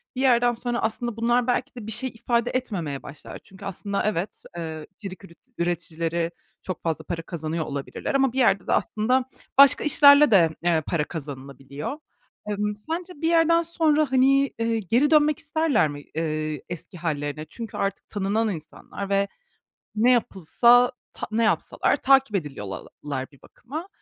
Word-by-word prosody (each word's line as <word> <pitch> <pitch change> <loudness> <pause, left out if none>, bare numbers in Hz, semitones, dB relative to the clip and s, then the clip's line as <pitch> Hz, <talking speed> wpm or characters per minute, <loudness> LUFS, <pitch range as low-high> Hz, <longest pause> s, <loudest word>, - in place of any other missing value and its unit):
bir 255 - -2
yerden 245 -2 +4
sonra 240 +1 -3
aslında 230 +1 -2
bunlar 240 +1 +2
belki 250 +2 -1
de 225 -3 -8
bir - - -3
şey 245 +4 +1
ifade 235 +1 -1
etmemeye 180 - -3
başlar. 145 0 -10
Çünkü 190 - -13
aslında 200 +1 -3
evet, 205 -2 -2
ııı, 160 -2 -5
içerik 195 -2 -9
üretic 190 +7 -18
üreticileri 170 -1 -2 0.3
çok 185 - -6
fazla 160 -1 -2
para 165 -1 -4
kazanıyor 160 -1 -4
olabilirler 140 - -4
ama 270 -3 +2
bir 265 - -1
yerde 195 -6 +3
de - - +2
aslında 250 +4 +1 0.3
başka 280 -1 +8
işlerle 290 -2 +7
de, 170 -5 +6
eee, 165 -3 +2
para 160 -3 0
kazanılabiliyor. 140 - -7 0.5
Emm, 210 0 -1
sence 330 - -5
bir 325 - +1
yerden 335 0 +4
sonra, 310 -4 +1
hani, 275 +1 +3
eee, 230 0 0
geri 240 - +2
dönmek 300 -1 +4
isterler 315 - +1
mi, 145 0 -7
eee, 155 -2 -2
eski 175 +2 -7
hâllerine? 150 -2 -3
Çünkü 230 -4 -7
artık 195 0 -3
tanınan 210 +2 0
insanlar 180 +3 -7
ve 200 0 +2 0.7
ne 235 +4 +4
yapılsa, 240 +2 +4 0.2
ta - - -6
ne 230 +1 +2
yapsalar 215 - +1
takip 270 -5 +3
ediliyorlar 135 - -6
bir 140 - -21
bakıma. 310 +9 -8
210 Hz, 155 wpm, -24 LUFS, 165-255 Hz, 0.7 s, başka